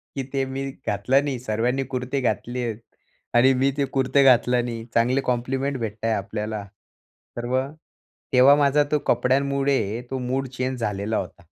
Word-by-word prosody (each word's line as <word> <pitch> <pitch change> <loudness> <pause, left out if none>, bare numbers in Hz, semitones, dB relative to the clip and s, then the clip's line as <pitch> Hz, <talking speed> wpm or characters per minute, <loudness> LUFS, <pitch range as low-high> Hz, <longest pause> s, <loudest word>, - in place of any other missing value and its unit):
की 135 - -2
ते 135 -1 +1
मी 135 +1 -4 0.2
घातलं 125 +7 +2
नाही. 135 -4 -3
सर्वांनी 125 +3 -1
कुर्ते 130 +2 -2
घातले 125 0 -2
आहेत 115 -2 -3 0.6
आणि 130 +2 +6
मी 135 +2 +2
ते 140 - +2
कुर्ते 135 +1 +2
घातलं 125 -1 +4
नाही. 115 -1 -5
चांगले 125 +4 +2
कॉम्प्लिमेंट 130 +3 -1
भेटत 110 -2 -5
आहे 115 - +2
आपल्याला. 105 +1 -3 0.7
तर 120 - -3
मग 130 +4 -1 0.6
तेव्हा 130 +2 +7
माझा 145 0 +3
तो 150 - +3
कपड्यांमुळे 135 -4 +1
तो 135 - -1
मूड 130 +2 -2
चेंज 130 0 -3
झालेला 105 0 -2
होता. 100 - -6
125 Hz, 160 wpm, -24 LUFS, 115-135 Hz, 0.7 s, तेव्हा